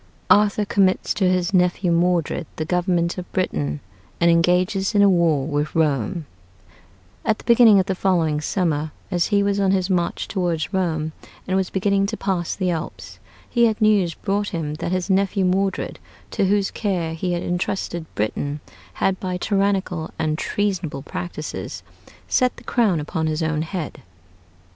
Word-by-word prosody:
ARTHUR 210 0 +4
COMMITS 195 -2 +2
TO 190 -3 +2
HIS 180 +1 0
NEPHEW 180 0 +2
MODRED 170 -1 +1
THE 155 - -3
GOVERNMENT 175 0 0
OF 180 - -9
BRITAIN, 75 - -1 0.4
AND 170 0 +5
ENGAGES 180 +4 +2
IN 205 - +6
A 200 - +6
WAR 165 -6 +2
WITH 150 0 -2
ROME 150 - 0 1.0
At 220 - +1
the - - -14
beginning 230 -4 +6
of 185 - +1
the 195 - -1
following 170 -5 +1
summer, 155 -3 -1 0.2
as 175 -2 +1
he 200 -2 +2
was 200 0 +1
on 195 -1 +2
his 190 0 +1
march 175 -2 0
toward 175 -5 -1
Rome 160 -4 0 0.4
and 190 - 0
was 190 -1 +1
beginning 200 +1 +1
to 220 +2 -4
pass 185 -4 -1
the 185 -2 0
Alps, 160 -2 -6 0.3
he 235 -1 +3
had 220 -1 +1
news 205 -6 +3
brought 205 0 -1
him 160 -6 -3
that - - -3
his 185 -1 -1
nephew 195 0 +2
Modred, 190 +1 0 0.3
to 195 - +1
whose 200 0 +1
care 180 -6 -2
he 175 +2 -2
had 175 - -2
intrusted 175 -2 -2
Britain, 140 +7 -2 0.3
had, 190 - 0
by 185 -1 -3
tyrannical 195 -4 0
and 155 -1 0
treasonable 185 -9 -2
practices, 155 -1 -6 0.4
set 255 -1 +2
the - - -13
crown 210 -9 +2
upon 160 +2 -2
his 155 +1 -1
own 160 -1 0
head. 165 -1 -5
180 Hz, 165 wpm, -22 LUFS, 165-195 Hz, 1.0 s, IN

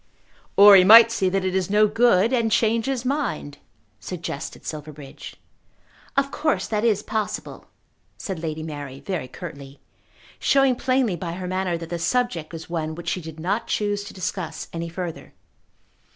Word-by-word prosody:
"Or 200 0 +10
he 185 - +8
might 225 +4 +9
see 190 -4 +1
that 190 0 -1
it 185 - -1
is 190 -1 0
no 210 +1 +4
good, 225 0 +3
and 230 -3 +1
change 225 +2 +2
his 260 -2 -2
mind," 245 - -2 0.4
suggested 170 -5 -6
Silverbridge. 150 -2 -8 0.8
"Of 275 0 +2
course 310 +2 0
that 215 -1 -1
is 210 -3 +2
possible," 215 -1 -4 0.5
said 190 -5 -5
Lady 155 -1 -4
Mary 145 -4 -7
very 175 -8 -4
curtly, 140 -1 -10 0.6
showing 270 -2 +3
plainly 255 -5 +1
by 170 0 -5
her 180 +1 -6
manner 185 -1 -1
that 165 0 -9
the 170 - -3
subject 175 -4 -1
was 165 -1 -8
one 160 -2 -3
which 175 - -5
she 180 - -2
did 160 -1 -10
not 195 +8 -2
choose 205 -1 -1
to - - -10
discuss 185 -2 -5
any 170 0 -4
further. 175 -1 -7
185 Hz, 165 wpm, -23 LUFS, 165-225 Hz, 0.8 s, Or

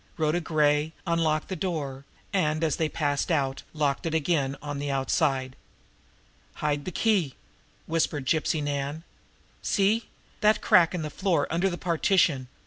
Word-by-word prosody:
Rhoda 160 +1 +1
Gray 150 -1 +2
unlocked 160 -2 +1
the 190 - -4
door, 150 -7 -3 0.3
and, 155 -4 +1
as 155 -3 +1
they 160 -1 0
passed 145 0 -1
out, 135 -4 0
locked 150 0 -1
it 160 - -1
again 145 -4 +1
on 145 -1 -5
the 145 0 -3
outside. 135 -1 0 1.0
"Hide 145 -1 -1
the 185 - -3
key!" 185 - +1 0.5
whispered 155 -4 -1
Gypsy 155 +1 +1
Nan. 145 +2 -3 0.6
"See 210 +3 +1 0.3
that 210 0 +4
crack 175 -1 +4
in 170 - -3
the 150 - -4
floor 175 -6 +1
under 175 +4 +2
the 175 - -4
partition! 165 -6 +2
155 Hz, 145 wpm, -27 LUFS, 145-170 Hz, 1.0 s, that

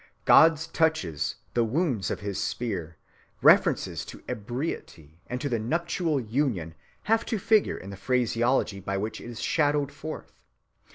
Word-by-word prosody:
God's 160 -1 +6
touches, 160 - 0 0.2
the 120 - +3
wounds 125 - 0
of - - -3
his 100 -1 -3
spear, 90 -9 -3 0.4
references - - +4
to - - -11
ebriety 105 - -5
and 125 - -3
to 125 -5 -1
nuptial 165 +4 0
union 110 - -1 0.3
have 225 +1 +2
to 225 - 0
figure 220 +1 +2
in 95 - -9
the - - -7
phraseology 120 -1 +1
by 95 0 -3
which 105 +3 -4
it - - -10
is 115 -2 -8
shadowed 145 -2 +1
forth. 145 +2 -8
125 Hz, 140 wpm, -27 LUFS, 100-155 Hz, 0.4 s, God's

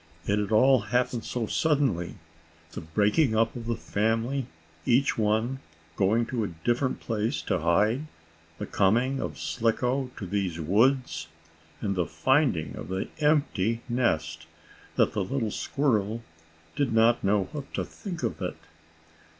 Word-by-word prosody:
It 100 +1 +1
had 105 +1 -2
all 130 +4 +6
happened 120 +2 0
so 120 -2 -2
suddenly 135 - +1 0.6
the - - -6
breaking 105 - +2
up 115 +1 +2
of 115 -2 -6
the 120 - 0
family, 115 +5 -1 0.4
each 130 +3 +3
one 110 +4 0 0.4
going 110 +6 +2
to 120 -1 -2
a - - -1 0.2
different 125 +2 +1
place 115 +4 -1
to - - 0
hide, 105 - +2 0.5
the - - -4
coming 120 +7 +2
of - - -4
Slicko 125 +3 0
to 100 - -5
these 95 -3 -2
woods, 100 - +2 0.5
and 100 -3 -1
the 90 -2 0
finding 125 - +1
of - - -7
the 95 +1 -3
empty 140 - +1
nest 80 -10 -1 0.5
that - - +3
the 105 -2 0
little 115 +1 -2
squirrel 115 -5 0 0.5
did 135 -5 0
not 115 +1 +4
know 100 0 +3
what 145 -2 -7
to - - -1
think 180 -6 -7
of - - -2
it. - - -3
115 Hz, 145 wpm, -27 LUFS, 100-130 Hz, 0.6 s, all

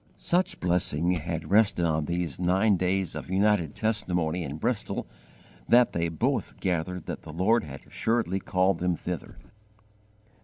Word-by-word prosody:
Such 180 +2 +1
blessing 85 -1 +1
had 85 -1 -3
rested 100 -4 +4
on 80 -2 0
these 85 -3 -3
nine 95 +4 +3
days 95 -1 0
of - - -7
united 95 -5 +2
testimony 90 -6 -1
in 70 0 -5
Bristol 110 +3 -2 0.6
that 120 0 +5
they 85 0 0
both 80 - -1
gathered 90 0 -2
that - - -5
the - - -9
Lord 105 +8 +2
had 70 -2 -9
assuredly 110 -5 0
called 90 -1 +1
them 90 -1 +1
thither. 90 +1 -6
90 Hz, 145 wpm, -27 LUFS, 85-100 Hz, 0.6 s, that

